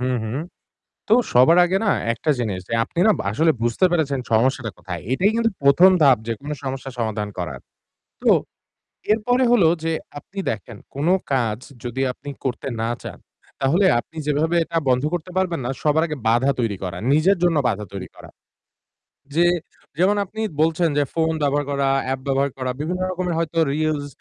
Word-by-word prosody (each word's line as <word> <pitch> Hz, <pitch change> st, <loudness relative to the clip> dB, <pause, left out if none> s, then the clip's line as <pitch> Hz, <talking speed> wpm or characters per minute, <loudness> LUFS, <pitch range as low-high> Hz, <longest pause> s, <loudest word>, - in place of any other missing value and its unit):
হুম, 125 Hz, 0 st, 0 dB
হুম। 110 Hz, +2 st, -4 dB, 0.7 s
তো 215 Hz, -, +4 dB, 0.2 s
সবার 130 Hz, +8 st, +6 dB
আগে 185 Hz, +2 st, +1 dB
না 210 Hz, -, +3 dB, 0.2 s
একটা 115 Hz, +7 st, -4 dB
জিনিস, 100 Hz, -6 st, -2 dB
যে -, -, -3 dB
আপনি 165 Hz, -, -6 dB
না -, -, +7 dB, 0.2 s
আসলে 160 Hz, +9 st, +3 dB
বুঝতে 120 Hz, +9 st, +2 dB
পেরেছেন 145 Hz, -6 st, 0 dB
সমস্যাটা 120 Hz, 0 st, +1 dB
কোথায়? 90 Hz, -3 st, -6 dB
এটাই 185 Hz, +10 st, +3 dB
কিন্তু 230 Hz, 0 st, +2 dB
১ম 140 Hz, +7 st, +7 dB
ধাপ 135 Hz, -4 st, +6 dB
যেকোনো 140 Hz, +6 st, -4 dB
সমস্যার 135 Hz, -1 st, -5 dB
সমাধান 110 Hz, -2 st, -2 dB
করার। 80 Hz, -8 st, -4 dB, 0.6 s
তো -, -, +1 dB, 0.8 s
এরপরে 245 Hz, +4 st, +2 dB
হলো 200 Hz, -9 st, +5 dB, 0.2 s
যে 165 Hz, -, 0 dB, 0.3 s
আপনি 195 Hz, -, -20 dB
দেখেন 110 Hz, 0 st, -5 dB, 0.2 s
কোন 145 Hz, +3 st, -1 dB, 0.3 s
কাজ 115 Hz, -4 st, 0 dB, 0.2 s
যদি 125 Hz, +2 st, -3 dB
আপনি 140 Hz, +3 st, -10 dB
করতে 130 Hz, +1 st, -3 dB
না 115 Hz, -, -1 dB
চান। -, -, -8 dB, 0.4 s
তাহলে 160 Hz, +9 st, +3 dB
আপনি 160 Hz, +6 st, -11 dB
যেভাবে 155 Hz, +3 st, +1 dB
এটা 165 Hz, +1 st, -3 dB
বন্ধ 125 Hz, +1 st, +2 dB
করতে 175 Hz, +1 st, -3 dB
পারবেন 180 Hz, -5 st, 0 dB
না, -, -, -2 dB
সবার 155 Hz, +1 st, +3 dB
আগে 150 Hz, -2 st, -4 dB
বাধা 120 Hz, +4 st, +3 dB
তৈরি 115 Hz, -4 st, 0 dB
করা, 90 Hz, -2 st, -4 dB, 0.2 s
নিজের 180 Hz, +6 st, +4 dB
জন্য 170 Hz, -3 st, +3 dB
বাধা 105 Hz, -1 st, -2 dB
তৈরি 95 Hz, -2 st, -6 dB
করা। -, -, -13 dB, 1.1 s
যে 170 Hz, -, +4 dB, 0.5 s
যেমন 190 Hz, +4 st, +3 dB
আপনি 220 Hz, +3 st, -9 dB, 0.2 s
বলছেন, 165 Hz, +2 st, +2 dB
যে -, -, +4 dB
ফোন 160 Hz, -1 st, +1 dB
ব্যবহার 145 Hz, 0 st, +1 dB
করা, 140 Hz, -1 st, +1 dB, 0.2 s
app 135 Hz, -, -3 dB
ব্যবহার 140 Hz, +1 st, +1 dB
করা, 130 Hz, -1 st, -2 dB
বিভিন্ন 180 Hz, +4 st, -2 dB
রকমের 180 Hz, -2 st, -2 dB
হয়তো 165 Hz, 0 st, -2 dB
reels, 155 Hz, -1 st, -1 dB
145 Hz, 175 wpm, -22 LUFS, 120-170 Hz, 1.1 s, না